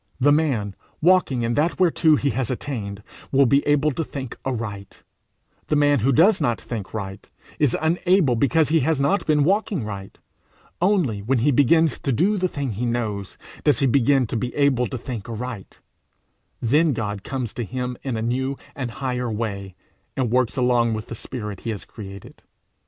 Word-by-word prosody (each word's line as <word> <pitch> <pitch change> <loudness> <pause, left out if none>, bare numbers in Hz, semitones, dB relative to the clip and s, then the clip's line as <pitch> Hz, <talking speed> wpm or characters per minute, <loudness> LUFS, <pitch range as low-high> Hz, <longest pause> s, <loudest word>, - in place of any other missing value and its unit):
The 145 +3 +4
man 130 -11 +1 0.2
walking 165 -8 +3
in 115 +1 0
that 155 +8 0
whereto 165 -3 +4
he 140 -1 0
has 130 -2 -2
attained, 105 -6 -4 0.3
will 140 0 +5
be 140 +3 +3
able 145 +1 +3
to 160 - -2
think 135 -4 -6
aright; 110 -6 -5 0.6
the - - +1
man 145 -1 +4
who 130 +5 +2
does 175 - +4
not 120 -6 +1
think 110 -5 -6
right, 95 -2 -6 0.3
is 145 -5 +2
unable 170 -3 +2
because 145 +5 +2
he 165 +1 +4
has 155 +1 +1
not 175 +7 +1
been 150 -2 +3
walking 195 - +1
right; 100 -2 -7 0.6
only 175 - +2
when 125 +6 +1
he 135 +5 +3
begins 145 +3 +3
to 140 - -1
do 195 - +2
the 185 - +2
thing 140 -7 -3
he 110 +4 -3
knows, 105 -5 -3 0.3
does 150 - +4
he 140 - +1
begin 135 +1 +3
to 115 - -5
be 120 +2 -3
able 135 -4 +2
to 130 - -5
think 120 -3 -6
aright; 115 -3 -6 0.8
then 150 +6 +3
God 105 -3 -3
comes 130 -5 -4
to 120 - -3
him 125 +3 -4
in 130 -4 -3
a 110 - -2
new 130 +3 -1 0.2
and 130 -3 -3
higher 125 +1 -3
way, 100 -4 -4 0.4
and 125 -4 0
works 125 0 +1
along 120 -3 +2
with 110 +1 -6
the - - -5
spirit 105 -4 -6
he 115 - -5
has 105 -3 -5
created. 100 -3 -11
130 Hz, 185 wpm, -23 LUFS, 115-145 Hz, 0.8 s, will